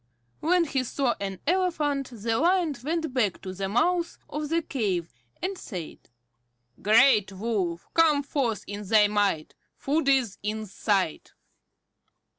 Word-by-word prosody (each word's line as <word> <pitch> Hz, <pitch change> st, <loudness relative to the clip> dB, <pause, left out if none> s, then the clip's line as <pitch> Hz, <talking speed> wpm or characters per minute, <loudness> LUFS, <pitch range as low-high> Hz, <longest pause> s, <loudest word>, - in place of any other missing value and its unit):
When 355 Hz, +2 st, +3 dB
he 275 Hz, -5 st, -1 dB
saw 255 Hz, 0 st, 0 dB
an 195 Hz, -2 st, -4 dB
elephant 305 Hz, -6 st, 0 dB
the 225 Hz, -1 st, -2 dB
Lion 345 Hz, -2 st, +2 dB
went 320 Hz, -1 st, -2 dB
back 220 Hz, -8 st, +1 dB
to 185 Hz, -, -5 dB
the 195 Hz, +1 st, -3 dB
mouth 335 Hz, -, +1 dB
of 300 Hz, 0 st, -4 dB
the 330 Hz, +1 st, +1 dB
cave, 195 Hz, -, -2 dB, 0.3 s
and 385 Hz, +2 st, -1 dB
said: 180 Hz, -, -7 dB, 0.8 s
"Great 215 Hz, -1 st, +5 dB
Wolf, 190 Hz, -5 st, -2 dB
come 310 Hz, -3 st, +4 dB
forth 260 Hz, -6 st, -1 dB
in 205 Hz, 0 st, -6 dB
thy 210 Hz, 0 st, +5 dB
might. 205 Hz, -6 st, 0 dB, 0.2 s
Food 285 Hz, +1 st, 0 dB
is 255 Hz, -7 st, +2 dB
in 215 Hz, +1 st, -3 dB
sight." 195 Hz, -4 st, -1 dB
240 Hz, 135 wpm, -26 LUFS, 205-305 Hz, 0.8 s, Great